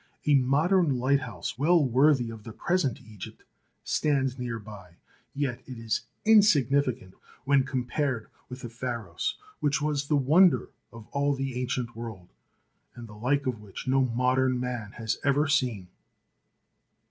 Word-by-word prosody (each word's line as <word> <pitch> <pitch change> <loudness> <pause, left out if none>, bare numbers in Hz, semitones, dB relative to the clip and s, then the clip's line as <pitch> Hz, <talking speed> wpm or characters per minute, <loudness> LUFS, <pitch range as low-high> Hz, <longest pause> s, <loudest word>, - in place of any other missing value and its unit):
A 150 - +4
modern 145 +3 +3
light 135 +3 +2
house, 115 -1 -6
well 160 +1 +4
worthy 130 -1 +3
of 110 -2 -10
the 115 - -8
present 175 -7 0
Egypt, 105 -4 -11 0.4
stands 135 -3 0
nearby, 105 -7 -7 0.4
yet 130 -4 -2
it 130 - -8
is 115 0 -2 0.2
insignificant 140 - +3 0.3
when 140 -1 +4
compared 130 -2 -2 0.2
with 125 +1 -8
the 120 - -6
Pharos 115 -7 -4 0.2
which 145 0 +1
was 145 -1 -1
the 150 - +2
wonder 160 +7 +4 0.2
of 115 -2 -11
all 140 0 +1
the 135 -1 -3
ancient 125 -2 -3
world, 110 -6 -8 0.7
and 120 -1 -9
the 105 - -12
like 130 +7 0
of 125 -4 -2
which 105 +2 -9
no 135 +1 +3
modern 125 +1 +1
man 120 -4 -4
has 110 -1 -3
ever 145 +2 +2
seen. 125 -10 0
130 Hz, 145 wpm, -27 LUFS, 115-140 Hz, 0.7 s, A